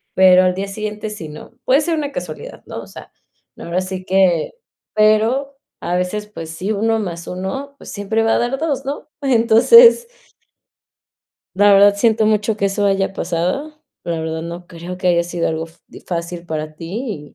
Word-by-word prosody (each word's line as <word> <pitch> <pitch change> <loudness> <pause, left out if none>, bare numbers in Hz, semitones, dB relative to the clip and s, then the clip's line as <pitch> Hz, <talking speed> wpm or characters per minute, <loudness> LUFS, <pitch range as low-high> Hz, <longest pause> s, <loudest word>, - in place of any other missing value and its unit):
Pero 185 -1 +6
al 185 - +2
día 195 +2 -4
siguiente 215 +1 -5
sí, 165 -7 -7
¿no? 150 +1 -11
Puede 265 +2 +4
ser 330 +2 0
una 290 -2 -3
casualidad, - - -7
¿no? - - -7
O - - -12
sea, - - -12 0.5
ahora 170 +2 -3
sí 185 0 -5
que, 185 -4 +2 0.4
pero 225 +6 +2 0.2
a 175 +1 -2
veces, 180 +4 -2
pues 165 -6 -8
sí, 185 +6 -3
uno 225 +2 +1
más 170 -4 -5
uno, 190 +10 -5
pues, - - -11
siempre 205 +2 -1
va 225 - +2
a - - +3
dar 245 +3 -1
dos, 285 -4 -2
¿no? 280 +2 -5
Entonces 275 - +6 1.5
La 205 0 +6
verdad 200 +1 +6
siento 220 0 +2
mucho 215 0 +1
que 200 - +1
eso 200 +1 -1
haya 195 -1 +1
pasado, 180 - -2 0.3
pero 170 -1 -3
la - - -3
verdad 160 0 -4
no 170 +1 -7
creo 175 +2 -8
que 185 - 0
haya 170 -1 +3
sido 175 0 -2
algo 160 0 -2
fa 165 +1 -22
di - - -13
fácil 170 0 -5
para 155 -2 -5
ti 170 - -6
195 Hz, 185 wpm, -19 LUFS, 175-225 Hz, 1.5 s, Pero